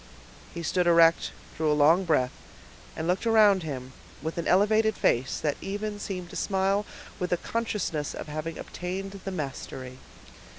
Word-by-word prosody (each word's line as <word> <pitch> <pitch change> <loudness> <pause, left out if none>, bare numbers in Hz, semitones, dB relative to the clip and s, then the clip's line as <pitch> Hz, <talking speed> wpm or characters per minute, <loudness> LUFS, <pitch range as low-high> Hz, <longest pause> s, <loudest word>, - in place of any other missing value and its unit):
He 170 - -6
stood 180 +2 +1
erect, 165 -1 +5 0.3
drew 155 -1 +1
a 150 - +2
long 165 +6 +5
breath, 130 -7 +2 0.6
and 160 - -3
looked 185 +6 0
around 210 -4 +6
him 130 -5 -6 0.3
with 160 +2 -3
an 170 - -2
elevated 215 +3 +4
face, 125 +3 +1
that 150 -2 -1
even 205 +1 -4
seemed 185 -3 -5
to - - -9
smile 195 +1 +1 0.3
with 180 - -2
a 175 - +3
consciousness 205 -9 -2
of - - -6
having 155 +2 -4
obtained 195 +2 -5
the - - -2
mastery. 130 -5 -6
175 Hz, 160 wpm, -27 LUFS, 155-195 Hz, 0.6 s, around